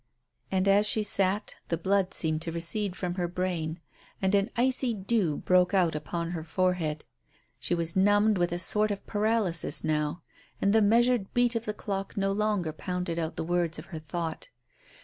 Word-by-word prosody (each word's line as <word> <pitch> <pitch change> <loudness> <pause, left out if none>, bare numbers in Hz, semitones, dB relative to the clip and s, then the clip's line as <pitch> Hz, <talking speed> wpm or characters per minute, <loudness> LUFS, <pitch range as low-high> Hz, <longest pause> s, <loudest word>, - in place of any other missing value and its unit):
And 190 0 +1
as 200 +2 +4
she 215 0 +2
sat 200 0 +1
the 165 - -1
blood 190 +2 +1
seemed 155 -1 -1
to 165 - -4
recede 180 +4 0
from 180 -2 -3
her 175 - 0
brain 175 -2 -3 0.4
and 190 0 +1
an 200 +2 +3
icy 255 -1 +1
dew 195 -6 0
broke 180 +1 +3
out 175 -4 +3
upon 165 +3 -3
her 165 -3 -4
forehead. 165 -2 -1 0.6
She 175 - 0
was 170 -1 -1
numbed 205 +1 +4
with 175 -1 +1
a 175 - -1
sort 210 +4 +3
of 200 -1 -4
paralysis 210 -5 0
now, 155 +1 -1 0.4
and 200 - +2
the 220 - +5
measured 230 0 +3
beat 245 0 +3
of 230 0 -2
the 210 - -2
clock 195 +1 -4
no 195 0 +1
longer 200 -5 0
pounded 180 0 -3
out 160 -1 -3
the - - -3
words 170 -1 0
of - - -8
her 160 - -4
thought. 165 - -5
185 Hz, 185 wpm, -28 LUFS, 170-205 Hz, 0.6 s, the